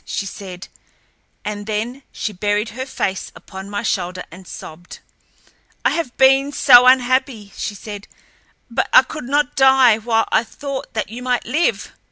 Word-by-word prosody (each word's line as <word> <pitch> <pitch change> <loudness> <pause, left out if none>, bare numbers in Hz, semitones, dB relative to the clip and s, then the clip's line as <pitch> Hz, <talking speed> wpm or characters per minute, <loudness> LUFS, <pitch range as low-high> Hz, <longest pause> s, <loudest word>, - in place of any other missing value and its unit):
she 200 - -4
said, 190 -1 -8 0.8
and 205 0 -5
then 225 +5 -3
she 215 - -4
buried 205 +3 -1
her 260 +4 -6
face 190 -7 -3
upon 190 0 -10
my 205 +1 -3
shoulder 180 -4 -2
and 180 +2 -13
sobbed. 165 +3 -10 0.9
"I - - +4
have 325 -8 -3
been 270 +1 +4
so 250 -3 +7
unhappy," 255 -4 +2
she 205 - -4
said, 205 0 -9 0.6
"but 250 +2 -1
I - - +8
could 300 0 -8
not 285 +1 0
die 265 -4 +5
while 225 0 +1
I 225 - +3
thought 275 +1 -7
that 215 -1 -2
you 240 +2 -7
might 250 -1 -1
live." 305 +8 0
230 Hz, 160 wpm, -19 LUFS, 205-260 Hz, 0.9 s, I